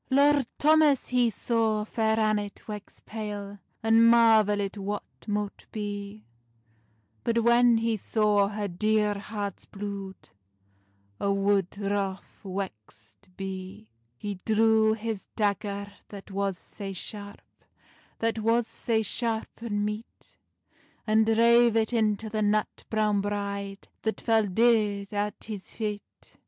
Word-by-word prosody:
Lord 280 Hz, -1 st, +4 dB
Thomas 305 Hz, -2 st, +4 dB
he 245 Hz, -2 st, +3 dB
saw 220 Hz, -1 st, 0 dB
Fair 220 Hz, 0 st, 0 dB
Annet 210 Hz, -2 st, 0 dB
wex 210 Hz, -2 st, -8 dB
pale, 205 Hz, -2 st, -6 dB, 0.2 s
And 225 Hz, 0 st, +5 dB
marvelit 215 Hz, -4 st, +4 dB
what 205 Hz, 0 st, -3 dB, 0.2 s
mote 205 Hz, -1 st, -3 dB
bee; 205 Hz, 0 st, -5 dB, 1.0 s
But 230 Hz, 0 st, +1 dB
when 235 Hz, 0 st, +5 dB
he 225 Hz, 0 st, 0 dB
saw 210 Hz, -1 st, +2 dB
her 205 Hz, 0 st, -3 dB
dear 210 Hz, +3 st, +1 dB
heart's 205 Hz, -2 st, -5 dB
blude, 200 Hz, -1 st, -7 dB, 0.9 s
A' 200 Hz, -, +1 dB
wood 195 Hz, -1 st, +1 dB
wroth 200 Hz, -1 st, -3 dB
wexed 185 Hz, -, -8 dB
bee. 190 Hz, -, -7 dB, 0.3 s
He 205 Hz, +2 st, -5 dB
drew 220 Hz, 0 st, +4 dB
his 220 Hz, -2 st, -4 dB
dagger 200 Hz, -1 st, -1 dB, 0.2 s
that 200 Hz, 0 st, -10 dB
was 195 Hz, -1 st, -1 dB
sae 195 Hz, 0 st, -8 dB
sharp, 205 Hz, +2 st, -7 dB, 0.7 s
That 225 Hz, 0 st, 0 dB
was 230 Hz, +2 st, +2 dB
sae 220 Hz, -1 st, -1 dB
sharp 225 Hz, 0 st, -2 dB
and 205 Hz, -3 st, -1 dB
meet, 210 Hz, +2 st, -7 dB, 0.7 s
And 220 Hz, 0 st, +3 dB
drave 235 Hz, +1 st, +5 dB
it 225 Hz, +1 st, +1 dB
into 220 Hz, -1 st, +1 dB
the 215 Hz, 0 st, -2 dB
nut 210 Hz, 0 st, 0 dB
browne 210 Hz, -2 st, +2 dB
bride, 200 Hz, -1 st, -4 dB
That 220 Hz, -, -2 dB
fell 225 Hz, -2 st, +2 dB
deid 210 Hz, -1 st, +2 dB
at 205 Hz, 0 st, -2 dB
his 210 Hz, -3 st, -7 dB
feit. 210 Hz, -2 st, -6 dB
210 Hz, 120 wpm, -27 LUFS, 200-225 Hz, 1.0 s, And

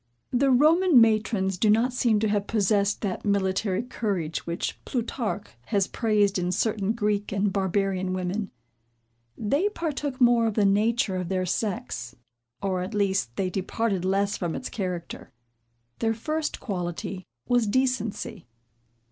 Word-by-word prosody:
The 270 Hz, +2 st, +3 dB
Roman 310 Hz, +4 st, +5 dB
matrons 215 Hz, -4 st, +2 dB
do 215 Hz, -, +3 dB
not 230 Hz, +4 st, +3 dB
seem 235 Hz, -4 st, +2 dB
to 220 Hz, -, +2 dB
have 205 Hz, -1 st, 0 dB
possessed 205 Hz, -1 st, +1 dB
that 195 Hz, -4 st, -3 dB
military 195 Hz, 0 st, 0 dB
courage 195 Hz, -11 st, -3 dB
which 170 Hz, 0 st, -3 dB
Plutarch 230 Hz, -4 st, -3 dB, 0.2 s
has 200 Hz, -4 st, +2 dB
praised 205 Hz, -4 st, +1 dB
in 180 Hz, 0 st, -1 dB
certain 210 Hz, +1 st, 0 dB
Greek 210 Hz, -2 st, -1 dB
and 200 Hz, 0 st, 0 dB
barbarian 190 Hz, -1 st, 0 dB
women; 185 Hz, +2 st, -2 dB, 0.9 s
they 285 Hz, -, +1 dB
partook 295 Hz, -8 st, -3 dB
more 240 Hz, -2 st, +5 dB
of 215 Hz, -, -2 dB
the 210 Hz, -, +3 dB
nature 210 Hz, +1 st, +2 dB
of 180 Hz, -2 st, -3 dB
their 185 Hz, -1 st, 0 dB
sex; 180 Hz, -, -3 dB, 0.5 s
or, 190 Hz, -2 st, 0 dB
at 185 Hz, +4 st, -5 dB
least, 190 Hz, -, 0 dB
they 185 Hz, -2 st, -1 dB
departed 195 Hz, +1 st, -1 dB
less 195 Hz, +2 st, +1 dB
from 175 Hz, -3 st, -2 dB
its -, -, -5 dB
character. 180 Hz, -5 st, -5 dB, 0.7 s
Their 225 Hz, 0 st, +1 dB
first 305 Hz, +7 st, -2 dB
quality 185 Hz, -1 st, -4 dB, 0.2 s
was 245 Hz, -3 st, +2 dB
decency. 225 Hz, -, -1 dB
205 Hz, 140 wpm, -26 LUFS, 190-230 Hz, 0.9 s, Roman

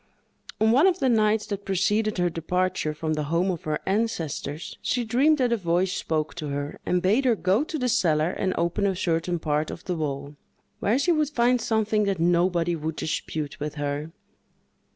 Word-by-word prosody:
On 220 Hz, +1 st, +4 dB
one 280 Hz, +10 st, +5 dB
of 370 Hz, -2 st, +2 dB
the 270 Hz, -7 st, +1 dB
nights 215 Hz, -2 st, +2 dB
that 200 Hz, -1 st, -5 dB
preceded 205 Hz, +3 st, +1 dB
her 180 Hz, 0 st, +2 dB
departure 180 Hz, 0 st, -1 dB
from 155 Hz, 0 st, -2 dB
the 150 Hz, -1 st, -2 dB
home 170 Hz, +5 st, +1 dB
of 170 Hz, -, -6 dB
her 155 Hz, -1 st, 0 dB
ancestors, 175 Hz, -8 st, -2 dB
she 245 Hz, -, 0 dB
dreamed 275 Hz, +7 st, +3 dB
that 250 Hz, -3 st, +2 dB
a -, -, +1 dB
voice 180 Hz, 0 st, 0 dB
spoke 155 Hz, -1 st, -2 dB
to 155 Hz, -3 st, -4 dB
her, 145 Hz, +1 st, -4 dB
and 180 Hz, 0 st, +1 dB
bade 210 Hz, +9 st, +3 dB
her 240 Hz, -3 st, +4 dB
go 200 Hz, +5 st, +2 dB
to 320 Hz, 0 st, -4 dB
the 250 Hz, -3 st, -1 dB
cellar 170 Hz, -9 st, +2 dB
and 190 Hz, -1 st, -1 dB
open 170 Hz, +4 st, +1 dB
a 190 Hz, -, 0 dB
certain 175 Hz, 0 st, 0 dB
part 155 Hz, -1 st, -1 dB
of -, -, -8 dB
the 180 Hz, -, -2 dB
wall, 140 Hz, -2 st, -4 dB, 0.4 s
where 220 Hz, +5 st, +2 dB
she 285 Hz, +6 st, +2 dB
would 305 Hz, -3 st, +2 dB
find 245 Hz, -3 st, +2 dB
something 220 Hz, -2 st, +1 dB
that 195 Hz, -3 st, -1 dB
nobody 175 Hz, 0 st, +2 dB
would 160 Hz, 0 st, -4 dB
dispute 155 Hz, -1 st, -4 dB
with 150 Hz, +1 st, -4 dB
her. 145 Hz, +1 st, -3 dB
185 Hz, 195 wpm, -25 LUFS, 160-220 Hz, 0.4 s, one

